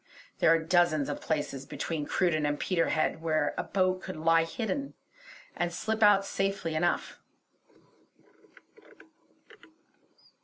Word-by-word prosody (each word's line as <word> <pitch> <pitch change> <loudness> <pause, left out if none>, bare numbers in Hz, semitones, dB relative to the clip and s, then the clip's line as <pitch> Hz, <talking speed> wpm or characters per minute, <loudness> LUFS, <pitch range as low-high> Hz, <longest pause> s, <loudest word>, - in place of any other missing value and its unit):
There - - +4
are 165 - +6
dozens 160 -3 +2
of 145 - -4
places 140 -3 -3
between 155 -3 -4
Cruden 170 -5 +1
and 145 0 -1
Peterhead 165 -3 0
where 155 -2 0
a - - -2
boat 185 -1 0
could 185 - -7
lie 165 +1 +3
hidden, 245 +10 -4 0.6
and 175 0 -1
slip 220 +5 -3
out 205 -2 +5
safely 195 -4 -2
enough. 175 +3 -1
165 Hz, 115 wpm, -29 LUFS, 155-185 Hz, 0.6 s, are